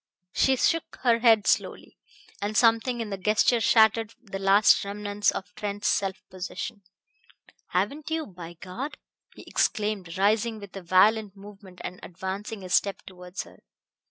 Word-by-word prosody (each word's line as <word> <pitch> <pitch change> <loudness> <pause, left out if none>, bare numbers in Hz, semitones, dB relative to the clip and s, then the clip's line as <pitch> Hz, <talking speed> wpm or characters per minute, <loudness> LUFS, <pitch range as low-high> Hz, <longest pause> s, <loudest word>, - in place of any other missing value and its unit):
She 265 - +3
shook 330 +5 0
her 235 -2 +4
head 225 -3 +5
slowly, - - 0 0.5
and 205 +1 -2
something 230 +1 +3
in 215 -2 -5
the 195 - -4
gesture 215 +4 +3
shattered 220 0 +4
the 195 -5 -7
last 195 +2 +5
remnants 205 0 -1
of 180 -1 -5
Trent's 205 +1 -2
self 195 -1 -1
possession. 195 +4 -6 0.9
"Haven't 245 - -2
you, 320 -1 -1
by 175 -4 -10
God!" 250 +11 -6 0.4
he - - -12
exclaimed, 205 -5 -1
rising 215 +3 +1
with 200 -2 -11
a 195 - -6
violent 200 +3 +3
movement 195 -2 -13
and 180 +1 -6
advancing 190 +3 -6
a 185 - -8
step 200 +1 +1
towards 180 0 -8
her. - - -17
205 Hz, 150 wpm, -26 LUFS, 190-225 Hz, 0.9 s, head